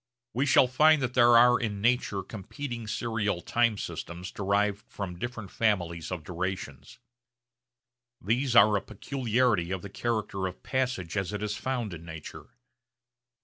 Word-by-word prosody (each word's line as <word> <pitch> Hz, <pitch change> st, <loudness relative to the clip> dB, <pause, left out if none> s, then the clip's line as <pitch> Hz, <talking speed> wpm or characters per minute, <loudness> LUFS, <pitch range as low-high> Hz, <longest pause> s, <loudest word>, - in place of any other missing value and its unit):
We 135 Hz, +4 st, 0 dB
shall 130 Hz, -, +6 dB
find 155 Hz, +5 st, +4 dB
that 125 Hz, -1 st, -2 dB
there 120 Hz, -1 st, +6 dB
are 125 Hz, +1 st, +6 dB
in 105 Hz, -4 st, -3 dB
nature 110 Hz, -3 st, +1 dB
competing 115 Hz, +2 st, -7 dB
serial 110 Hz, -4 st, -1 dB
time 115 Hz, +3 st, +1 dB
systems 90 Hz, -1 st, -6 dB
derived 100 Hz, +1 st, 0 dB
from 90 Hz, -4 st, -6 dB
different 110 Hz, -4 st, -5 dB
families 85 Hz, -7 st, -1 dB
of 90 Hz, -4 st, -4 dB
durations. 90 Hz, -5 st, -5 dB, 1.2 s
These 120 Hz, +5 st, 0 dB
are 105 Hz, 0 st, +7 dB
a 100 Hz, -, +1 dB
peculiarity 120 Hz, -5 st, 0 dB
of 95 Hz, 0 st, -3 dB
the 100 Hz, -, -7 dB
character 105 Hz, -4 st, -2 dB
of 90 Hz, -, -9 dB
passage 125 Hz, -10 st, -2 dB
as 95 Hz, 0 st, -2 dB
it 105 Hz, 0 st, -3 dB
is 105 Hz, 0 st, -2 dB
found 120 Hz, -5 st, -3 dB
in 80 Hz, -1 st, -9 dB
nature. 80 Hz, -2 st, -9 dB
105 Hz, 145 wpm, -28 LUFS, 95-120 Hz, 1.2 s, are